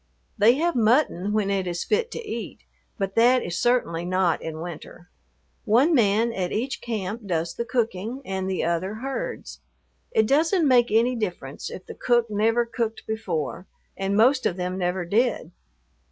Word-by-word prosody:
They 230 +4 +5
have 340 +4 +1
mutton 220 - +2
when 210 -2 +1
it 190 -2 -1
is 175 -1 -2
fit 460 +2 0
to 470 - -7
eat, - - -6 0.4
but 195 -2 -2
that 245 +3 +4
is 175 - -3
certainly 240 -9 +1
not 185 -1 +1
in 160 -1 -6
winter. 175 +1 -9 0.5
One 250 +9 +4
man 230 -2 +3
at 185 -3 -2
each 255 +5 -2
camp 215 -1 -4
does 165 -2 -1
the 235 - -4
cooking 230 +1 -2
and 190 0 -3
the 190 - -1
other 170 +5 -1
herds. 275 - -5 0.5
It 220 - +2
doesn't 320 - +3
make 245 -2 +4
any 235 +4 +3
difference 175 - -4
if 185 - -9
the - - -8
cook 240 -2 +1
never 225 +3 +2
cooked 230 -1 -3
before, 185 -6 -3 0.3
and 195 +1 -1
most 255 +4 +4
of 180 - -3
them 180 0 -2
never 180 -1 -1
did. 215 -2 0
215 Hz, 170 wpm, -24 LUFS, 185-245 Hz, 0.5 s, They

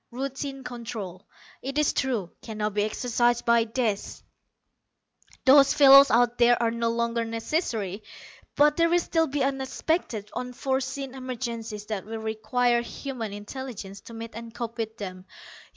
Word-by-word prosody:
Routine 270 +2 -5
control, 220 -6 -7 0.3
it 275 +2 -5
is 300 -1 +3
true, 230 -10 -1
can 220 -1 -8
now 210 0 0
be 205 +1 0
exercised 240 +2 +1
by 235 -1 +4
this 225 -3 -2 1.2
those 275 +1 +7
fellows 275 -1 +9
out 240 +1 +3
there 240 0 +5
are 230 -1 +1
no 230 0 0
longer 235 0 0
necessary 225 - -2 0.5
but 295 +1 +4
there 335 0 +4
will 345 - +4
still 325 -2 +1
be 280 +1 -2
the - - +3
unexpected, 265 - -2
unforeseen 265 +1 -3
emergencies 235 -5 -5
that 210 -3 -4
will 225 0 -5
require 235 +2 +1
human 240 -2 -6
intelligence 205 -2 -7
to 230 - -11
meet 230 0 -7
and 230 0 -9
cope 235 -1 -5
with 220 0 -3
them. 185 -3 -7
235 Hz, 150 wpm, -26 LUFS, 220-265 Hz, 1.2 s, fellows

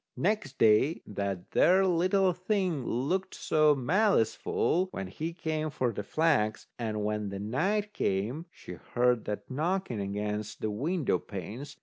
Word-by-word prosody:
Next 180 -9 -1
day 115 +8 +4
that 100 -3 -4
there 190 +2 +5
little 185 +1 +3
thing 180 - -1
looked 180 +11 -1
so 155 -1 +3
maliceful 180 - +2
when 95 - -5
he 155 - -4
came 155 -2 -2
for 130 -4 -1
the 105 - -3
flax. 110 -3 +1
And 110 -3 -2
when 105 -1 -1 0.2
night 205 - 0
came, 115 - -1
she - - -11 0.2
heard 125 -1 +3
that 105 +5 -5
knocking 160 - -1
against 105 +1 -3
the 110 - -1
window 150 - 0
panes. 110 - -7
140 Hz, 135 wpm, -29 LUFS, 105-180 Hz, 0.2 s, there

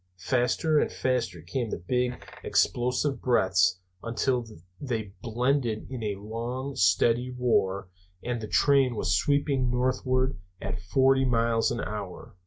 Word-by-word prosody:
Faster 130 - +1
and - - 0
faster 115 -10 -1
came 115 +7 -3
the - - -3
big 125 +8 -2 0.2
explosive 125 +3 +1
breaths, 95 -6 +3 0.2
until 120 +2 0 0.4
they 110 -8 -4
blended 125 -1 0
in 130 -3 -5
a 105 -2 -2
long 120 +6 -5
steady 115 +8 +3
roar, 100 -6 +1 0.4
and 120 -1 -2
the 110 - -5
train 135 -2 +3
was 90 -4 +1
sweeping 140 +1 +1
northward 130 -2 0 0.2
at 95 -2 -4
forty 135 +8 +3
miles 115 -2 +2
an 115 - -2
hour. 105 -3 -6
120 Hz, 130 wpm, -27 LUFS, 105-130 Hz, 0.4 s, breaths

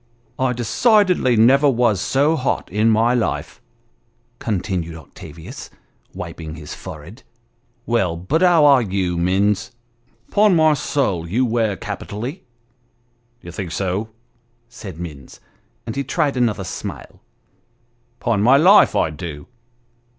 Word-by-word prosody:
" - - -35
I - - 0
decidedly 180 - +2
never 135 +6 +5
was 115 -6 +1
so 145 +8 +2
hot 130 - -2
in 105 +3 +2
my 115 +2 +3
life," 120 -3 -2 0.8
continued 90 -6 -3
Octavius, 80 +1 -11 0.5
wiping 80 -2 -7
his 75 -2 -9
forehead; 85 - -10 0.6
"well, 95 -8 0
but 135 - -1
how 175 -4 +5
are 140 -3 +6
you, 95 -4 -1
Minns? 95 +4 0 0.6
Ton 205 -2 +4
my 155 -1 +4
soul, 100 - -1
you 125 +8 +1
wear 110 -4 0
capitally! 120 - -6 0.3
" 120 -1 -43
" 120 0 -43
D'ye 85 - -10
think 85 0 -6
so? 95 +4 -2 0.3
" 120 - -42 0.3
said 100 -8 -10
Minns; 75 -6 -9 0.5
and 115 - -5
he 140 - -1
tried 145 -2 -1
another 115 -6 0
smile. 90 - -8 0.5
" 120 0 -42
Ton 110 -4 +1
my 125 +6 +6
life, 185 +8 +6
I 80 - +1
do 75 -2 -8
115 Hz, 135 wpm, -20 LUFS, 90-130 Hz, 0.8 s, are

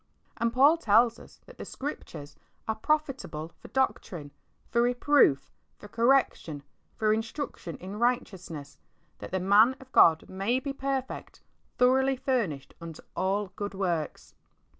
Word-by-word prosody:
And 230 0 0
Paul 280 +7 +5
tells 230 -3 +3
us - - -16
that - - -16
the - - -5
Scriptures 155 - -7 0.3
are 220 - +1
"profitable 250 - -2
for - - -12
doctrine, 175 - -2 0.4
for 235 - +3
reproof, 245 - +3 0.3
for - - -12
correction, 230 - +1 0.3
for 215 -1 +2
instruction 225 - -5
in 195 +3 -8
righteousness, 185 - -2 0.4
that - - -8
the 190 - -1
man 210 +7 +5
of 260 -1 -16
God 160 -8 +5
may 200 +7 -1
be 275 +1 -4
perfect, 270 -1 -4 0.3
throughly 265 +2 +4
furnished 230 - -2
unto 165 -2 -9
all 195 +1 0
good 205 0 -5
works." 175 -5 -3
220 Hz, 135 wpm, -28 LUFS, 180-260 Hz, 0.4 s, Paul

